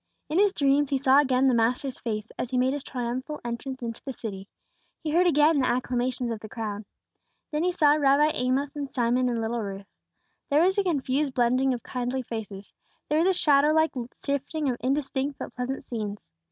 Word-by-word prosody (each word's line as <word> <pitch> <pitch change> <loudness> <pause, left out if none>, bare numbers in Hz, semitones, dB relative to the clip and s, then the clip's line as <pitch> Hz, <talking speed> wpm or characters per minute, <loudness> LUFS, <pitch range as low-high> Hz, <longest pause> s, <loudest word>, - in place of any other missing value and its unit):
In 315 +5 +1
his 405 -1 +5
dreams 285 -4 +2
he 275 - +1
saw 265 +1 +5
again 265 -2 +3
the 260 - +4
Master's 245 +4 0
face 215 -2 -4
as 250 - -2
He 255 - -1
made 255 +2 +2
His 285 -1 -4
triumphal 255 +4 -4
entrance 250 +2 -5
into 230 -1 -5
the 270 - -5
city; 200 -5 -7 0.6
he 310 - -2
heard 355 +3 +4
again 300 -1 +4
the 255 - +2
acclamations 250 0 -1
of 225 - -4
the 215 - -10
crowd. 210 -2 -5 0.7
Then 300 0 -1
he 360 - +2
saw 305 -5 +4
Rabbi 295 +1 +4
Amos 265 +3 -1
and 285 -2 -4
Simon 250 0 +1
and 235 -1 -1
little 225 +1 -2
Ruth. 195 -1 -6 0.6
There 295 +3 +4
was 380 +2 +3
a - - +3
confused 285 -4 0
blending 255 +2 +2
of 245 -2 -3
kindly 250 +1 -3
faces; 210 -4 -7 0.4
there 300 - +2
was 335 - +3
a 380 - +4
shadow 295 -3 +4
like 315 0 +3 0.3
shifting 280 +1 -1
of 240 - -4
indistinct 275 +1 -1
but - - -7
pleasant 255 +2 -4
scenes. 210 -4 -4
260 Hz, 200 wpm, -26 LUFS, 240-290 Hz, 0.7 s, his